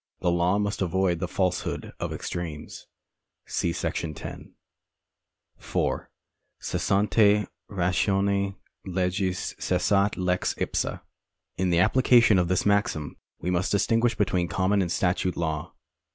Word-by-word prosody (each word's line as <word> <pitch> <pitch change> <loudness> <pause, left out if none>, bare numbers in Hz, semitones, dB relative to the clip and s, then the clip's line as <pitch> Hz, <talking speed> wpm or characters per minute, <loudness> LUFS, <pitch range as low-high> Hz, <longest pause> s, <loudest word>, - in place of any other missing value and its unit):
The 90 - +2
law 85 +3 +2
must 105 -1 -1
avoid 95 -1 +1
the 90 - -2
falsehood 90 0 -2
of - - -3
extremes. 80 -4 -6 0.6
See 85 - -1
§ 85 -2 -3
10. - - -9 1.0
4. - - -2 0.5
Cessante 105 +1 +2 0.2
ratione 100 +1 +1 0.3
lecjis 90 0 -1
cessat 100 +3 +1
lex 90 -1 0
ipsa. - - -2 0.6
In 95 0 +1
the 85 - +2
application 115 +1 +5
of 90 - +1
this 95 +1 +1
maxim 100 -7 +1 0.3
wo 90 - -1
must 90 +1 0
distinguish 115 +3 +2
between 95 -4 +1
common 100 +3 +1
and 85 -2 -1
statute 90 0 0
law. 80 -2 -2
95 Hz, 120 wpm, -26 LUFS, 90-100 Hz, 1.0 s, application